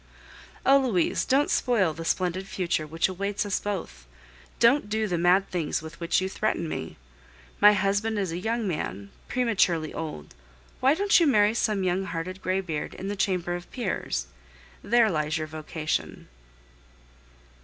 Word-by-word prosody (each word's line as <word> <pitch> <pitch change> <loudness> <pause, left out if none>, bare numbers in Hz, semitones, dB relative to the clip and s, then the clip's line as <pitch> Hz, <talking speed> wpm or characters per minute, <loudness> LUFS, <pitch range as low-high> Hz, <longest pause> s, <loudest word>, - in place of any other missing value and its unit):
Oh! 275 +1 +6
Louise, 220 -11 +1
don't 275 +2 +2
spoil 205 -10 +2
the 165 +2 -7
splendid 185 +2 -1
future 170 -5 -1
which 165 +2 +1
awaits 200 +2 -2
us 200 - 0
both! 195 - -5 0.5
Don't 235 -1 +4
do 220 0 0
the 180 - -1
mad 180 +3 +4
things 165 -3 -2
with 160 +1 -10
which 170 0 +1
you 185 - -1
threaten 190 -4 -1
me. 80 - -5 0.6
My 210 0 +8
husband 205 +3 0
is 195 -4 -1
a 170 - -3
young 225 +2 -1
man, 100 - -4 0.2
prematurely 190 -10 +1
old; 155 - -6 0.5
why 270 +3 +4
don't 400 +3 +4
you 335 - +4
marry 210 -5 +4
some 215 -4 0
young 185 +1 0
hearted 185 +1 -5
graybeard 185 -5 -2
in 195 - -5
the 205 - -2
Chamber 180 -3 0
of 175 0 -8
Peers? 185 - -2 0.6
There 230 -1 +3
lies 155 0 0
your 155 - -3
vocation. 155 0 -4
190 Hz, 155 wpm, -26 LUFS, 165-215 Hz, 0.6 s, My